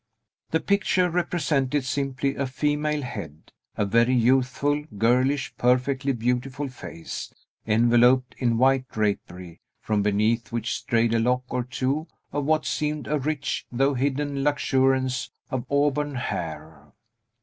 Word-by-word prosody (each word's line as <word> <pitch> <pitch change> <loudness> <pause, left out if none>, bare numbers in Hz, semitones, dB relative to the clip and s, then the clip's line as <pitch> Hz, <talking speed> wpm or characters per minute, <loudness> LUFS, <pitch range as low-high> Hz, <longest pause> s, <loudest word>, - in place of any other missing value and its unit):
The 160 - +1
picture 185 -2 +1
represented 150 -6 0
simply 135 0 -1
a 140 -1 -2
female 150 +2 -1
head; 85 - -8 0.3
a 105 - +1
very 115 +5 +3
youthful, 130 +4 +2
girlish, 130 +6 +2
perfectly 130 +3 +2
beautiful 125 +3 -2
face, 85 -9 -8 0.4
enveloped 120 +3 +4
in 120 -3 +1
white 130 +1 +3
drapery, 90 -5 -3 0.2
from 105 -1 0
beneath 110 +3 +1
which 115 0 -2
strayed 115 -2 +1
a 115 - +3
lock 125 +2 +1
or 125 - -1
two 130 +5 -2 0.3
of 145 -1 -1
what 155 +1 +2
seemed 150 -1 -2
a 150 +1 0
rich, 140 0 -2
though 135 +3 +2
hidden 140 +1 -1
luxuriance 130 -2 +1 0.2
of 130 -1 -3
auburn 145 0 +1
hair. 80 - -5
130 Hz, 125 wpm, -25 LUFS, 115-145 Hz, 0.4 s, enveloped